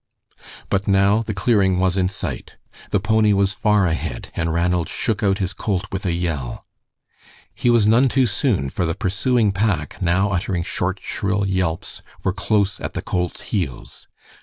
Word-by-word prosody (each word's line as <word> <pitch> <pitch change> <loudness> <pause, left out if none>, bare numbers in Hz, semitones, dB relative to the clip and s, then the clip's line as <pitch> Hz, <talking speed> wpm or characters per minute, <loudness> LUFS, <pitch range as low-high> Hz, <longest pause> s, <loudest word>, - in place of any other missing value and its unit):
But 100 0 0
now 100 +2 +4
the 110 -1 -4
clearing 95 -3 +2
was 95 0 +2
in 90 -1 +1
sight. 95 - -6 0.3
The - - +2
pony 110 -1 +3
was 100 -1 +2
far 105 0 +2
ahead, 80 -7 -3
and 80 0 -1
Ranald 85 0 +1
shook 110 -3 -1
out 100 -2 +2
his 95 -1 -2
colt 100 -2 -2
with 95 0 -3
a - - +1
yell. 85 -7 -3 0.9
He 120 - 0
was 120 -3 +4
none 120 +5 +5
too 130 +1 +3
soon, 100 - 0
for 90 - -2
the 85 - -1
pursuing 110 +2 +1
pack, 95 -7 -1
now 95 +3 +2
uttering 90 -2 -1
short, 95 +2 -2
shrill 100 0 -1
yelps, 90 -4 -2 0.2
were 95 - +1
close 105 -2 0
at - - -5
the - - -3
colt's 90 -1 -2
heels. 85 - -4
95 Hz, 170 wpm, -21 LUFS, 90-105 Hz, 0.9 s, none